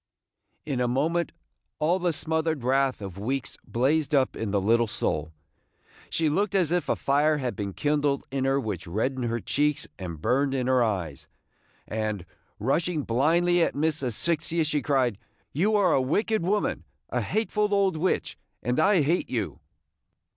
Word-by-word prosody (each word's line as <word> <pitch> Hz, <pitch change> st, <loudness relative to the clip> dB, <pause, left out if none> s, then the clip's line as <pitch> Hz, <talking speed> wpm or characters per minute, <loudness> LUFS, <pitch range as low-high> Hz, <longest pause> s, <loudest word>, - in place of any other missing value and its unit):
In 135 Hz, -4 st, -1 dB
a 125 Hz, -, +2 dB
moment 160 Hz, +8 st, 0 dB, 0.5 s
all 165 Hz, +5 st, +2 dB
the 175 Hz, -1 st, +1 dB
smothered 160 Hz, -2 st, -1 dB
wrath 130 Hz, -2 st, +1 dB
of 95 Hz, -1 st, -7 dB
weeks 130 Hz, +5 st, -2 dB
blazed 145 Hz, +4 st, +1 dB
up 130 Hz, -2 st, +2 dB
in 110 Hz, -, -3 dB
the 100 Hz, 0 st, +1 dB
little 115 Hz, +4 st, +3 dB
soul. 80 Hz, -8 st, -2 dB, 0.8 s
She 160 Hz, -, +1 dB
looked 200 Hz, +7 st, 0 dB
as 175 Hz, -5 st, +2 dB
if 175 Hz, 0 st, 0 dB
a -, -, +3 dB
fire 150 Hz, +2 st, +2 dB
had 130 Hz, -4 st, -3 dB
been 100 Hz, -3 st, -4 dB
kindled 145 Hz, 0 st, 0 dB
in 135 Hz, -1 st, -1 dB
her 135 Hz, +1 st, +2 dB
which 105 Hz, -10 st, -4 dB
reddened 125 Hz, +8 st, -1 dB
her 120 Hz, 0 st, -1 dB
cheeks 145 Hz, +7 st, 0 dB
and 85 Hz, -4 st, -6 dB
burned 135 Hz, -, +1 dB
in 130 Hz, -2 st, 0 dB
her 130 Hz, -1 st, +3 dB
eyes; 90 Hz, -, -3 dB, 0.6 s
and, 110 Hz, -4 st, -3 dB, 0.3 s
rushing 155 Hz, -, 0 dB
blindly 170 Hz, +9 st, +2 dB
at -, -, +1 dB
Miss 155 Hz, +1 st, 0 dB
Asphyxia, 160 Hz, +6 st, 0 dB
she 150 Hz, -1 st, 0 dB
cried, 125 Hz, -6 st, +1 dB, 0.3 s
"You 200 Hz, +9 st, +2 dB
are 190 Hz, -5 st, +4 dB
a 135 Hz, -, +3 dB
wicked 210 Hz, -, +1 dB
woman, 200 Hz, +4 st, 0 dB, 0.3 s
a -, -, 0 dB
hateful 210 Hz, -1 st, 0 dB
old 195 Hz, -3 st, +2 dB
witch, 175 Hz, +4 st, -1 dB, 0.2 s
and 125 Hz, +3 st, 0 dB
I 190 Hz, +1 st, +4 dB
hate 165 Hz, +6 st, 0 dB
you!" 110 Hz, -6 st, -3 dB
140 Hz, 165 wpm, -26 LUFS, 120-165 Hz, 0.8 s, are